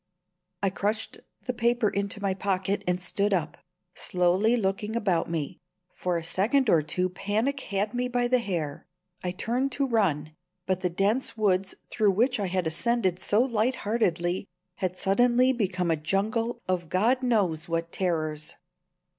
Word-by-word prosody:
I 195 - +2
crushed 210 +3 -2 0.3
the 250 - -1
paper 235 -1 +2
into 200 0 -1
my 195 -1 +1
pocket, 195 0 -1
and 180 0 +1
stood 200 +2 0
up, 155 -4 -3 0.3
slowly 185 +6 +2
looking 210 +1 -1
about 190 -9 +1
me. 160 -4 -3 0.3
For 180 -1 -1
a 165 - -4
second 215 +8 +2
or 160 - +5
two 180 +5 -1
panic 215 +9 -1
had 205 -2 -2
me 250 0 0
by 245 0 +1
the 255 +1 +3
hair. 170 -10 -3 0.4
I 180 - -1
turned 240 +8 -1
to 280 - +1
run, 160 - +1 0.3
but 185 -1 0
the 180 - 0
dense 205 +9 0
woods 195 -3 +1 0.2
through 210 -4 +3
which 245 +4 +2
I 200 - 0
had 185 -1 -1
ascended 185 +2 +1
so 210 +5 +3
light 245 0 +1
heartedly 185 -4 0 0.3
had 185 -2 -2
suddenly 245 +7 +3
become 185 -7 0
a - - +3
jungle 220 +9 -1
of 175 -3 -1
God 225 +9 +2
knows 190 -9 +1
what 165 0 -1
terrors. 155 -4 -2
195 Hz, 160 wpm, -27 LUFS, 180-230 Hz, 0.4 s, or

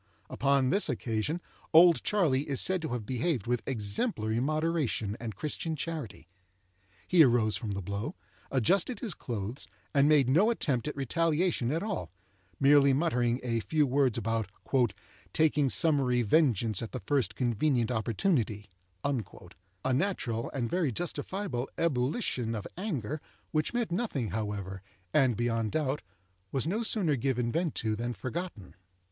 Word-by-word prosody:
Upon 140 -2 +2
this 200 - +3
occasion 115 +8 -1 0.3
"Old 170 +1 +7
Charley" 150 -9 +1
is 140 - +1
said 185 -1 +1
to 160 - -3
have 120 -3 -3
behaved 130 - -1
with 125 0 0
exemplary 110 - 0
moderation 155 -7 0
and 115 -4 -5
Christian 155 - -3
charity. 150 - -5 0.8
He 180 -2 +5
arose 120 -6 +4
from 110 -5 -3
the 100 -1 -4
blow, 100 - -4 0.3
adjusted 170 - +1
his 225 -8 -3
clothes, 115 -2 -5 0.3
and 140 0 +4
made 145 -4 +5
no 170 - +4
attempt 140 - 0
at 150 - -3
retaliation 160 0 +1
at 165 +4 -1
all—merely 100 - +1
muttering 125 -5 +1
a 115 -2 0
few 150 +6 +1
words 135 -3 +2
about 115 -3 -1 0.8
"taking 150 -3 +3
summary 135 -6 +3
vengeance 115 - +3
at 115 - -6
the 125 - -4
first 130 -9 +1
convenient 120 0 +1
opportunity,"—a 105 - -3
natural 125 - -1
and 125 -4 -2
very 170 -1 0
justifiable 175 - -3
ebullition 130 - 0
of 105 - -5
anger, 155 - -3 0.3
which 155 0 0
meant 240 -5 -1
nothing, 170 - -1
however, 100 -3 -4 0.3
and, 130 -6 +3
beyond 115 -2 0
doubt, 150 -2 0 0.5
was 135 - 0
no 200 +8 0
sooner 195 -9 +3
given 125 -2 0
vent 165 0 -1
to 110 -1 0
than 120 +2 -3
forgotten. 130 - -6
130 Hz, 140 wpm, -30 LUFS, 110-160 Hz, 0.8 s, Old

